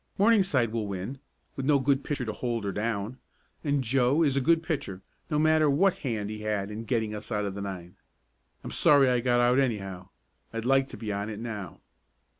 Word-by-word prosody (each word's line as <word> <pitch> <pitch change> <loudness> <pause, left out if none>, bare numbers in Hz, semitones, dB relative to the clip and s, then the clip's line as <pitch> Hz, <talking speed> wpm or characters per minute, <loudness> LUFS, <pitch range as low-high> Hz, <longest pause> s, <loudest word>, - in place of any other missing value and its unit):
Morningside 190 - +3
will 110 -2 -2
win, 100 +8 -5 0.4
with 135 - -4
no 150 -1 +5
good 135 +1 +1
pitcher 140 -4 -2
to 110 - -3
hold 120 0 -3
her 100 - -1
down, 110 +3 -3 0.4
and 145 -2 +1
Joe 130 +5 +2
is 140 -4 +2
a 140 - +2
good 165 +4 +3
pitcher, 145 - -4 0.3
no 150 - 0
matter 155 0 +4
what 180 +7 +3
hand 110 -6 -3
he 110 - -6
had 105 -1 -2
in 110 +2 -6
getting 110 -3 -1
us 105 +2 -8
out 105 -1 0
of 100 - -3
the 100 - -6
nine. 90 -3 -7 0.7
I'm - - -6
sorry 140 -3 +5
I 125 -1 +2
got 120 0 +2
out 120 +2 +4
anyhow. 95 -7 -2 0.4
I'd 115 0 -4
like 135 +1 +3
to - - -9
be 105 -3 -4
on 100 +2 -3
it 105 -1 -6
now." 105 -6 -6
120 Hz, 210 wpm, -28 LUFS, 105-140 Hz, 0.7 s, no